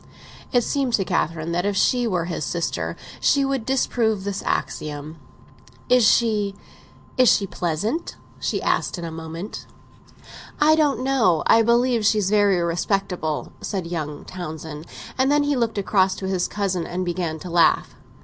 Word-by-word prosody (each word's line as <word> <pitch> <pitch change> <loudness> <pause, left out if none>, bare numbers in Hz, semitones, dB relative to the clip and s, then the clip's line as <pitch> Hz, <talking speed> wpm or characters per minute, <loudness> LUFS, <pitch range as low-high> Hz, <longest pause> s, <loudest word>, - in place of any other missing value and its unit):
It 245 -1 +3
seemed 270 -2 -1
to 195 - +2
Catherine 165 -2 -1
that 175 +1 0
if 200 0 0
she 245 +3 +2
were 180 -5 0
his 165 -3 -3
sister 170 +2 -2 0.2
she 280 -1 +3
would 270 -4 -2
disprove 230 -6 +1
this 200 -1 -3
axiom. 150 +1 -3 0.7
"Is 250 -1 +5
she—is 215 +3 0
she 200 - +3
pleasant?" 195 - -2 0.2
she - - -2
asked - - 0
in 170 - -5
a 165 - -5
moment. 165 +4 -7 0.9
"I 305 +1 +5
don't 295 -5 +2
know—I 230 - +3
believe 235 0 +2
she's 205 -2 +2
very 205 -3 +4
respectable," 175 -2 -1
said 190 -4 -3
young 155 -4 -5
Townsend. 160 -3 -7 0.3
And 265 +2 +3
then 295 0 +3
he 290 0 +1
looked 230 -3 -1
across 190 -1 +2
to 190 - -6
his 185 -2 0
cousin 190 -4 -2
and 180 +1 -3
began 175 -2 -2
to 175 +2 -8
laugh. 170 -1 +3
195 Hz, 150 wpm, -23 LUFS, 170-235 Hz, 0.9 s, Is